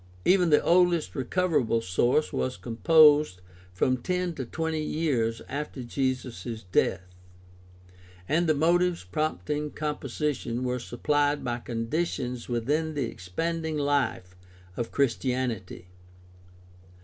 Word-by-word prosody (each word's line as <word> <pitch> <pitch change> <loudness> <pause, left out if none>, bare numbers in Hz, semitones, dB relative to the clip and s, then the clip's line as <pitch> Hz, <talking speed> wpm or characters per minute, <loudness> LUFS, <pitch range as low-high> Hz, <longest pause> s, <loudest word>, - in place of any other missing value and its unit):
Even 180 -2 +4
the 150 - +4
oldest 175 -2 +3
recoverable 135 -4 +1
source 120 +8 +1
was 130 0 -1
com 115 -2 -7
posed 150 - +6 0.3
from 130 +8 +1
ten 180 +6 -2
to 130 - -5
twenty 160 +4 -2
years 135 -8 -1
after 140 -2 -5
Jesus' 120 -4 -3
death, 90 - +2 1.2
and 170 +3 +2
the 155 - +3
motives 175 - +2
prompting 150 +6 -2
composition 145 -4 -3
were 125 0 -1
supplied 145 +4 0
by 120 0 -2
conditions 125 +1 -3
within 150 +7 -1
the 145 - 0
expanding 160 - -3
life 140 -10 0 0.4
of 115 +2 -3
Christianity. 125 -8 -1
140 Hz, 110 wpm, -27 LUFS, 120-155 Hz, 1.2 s, posed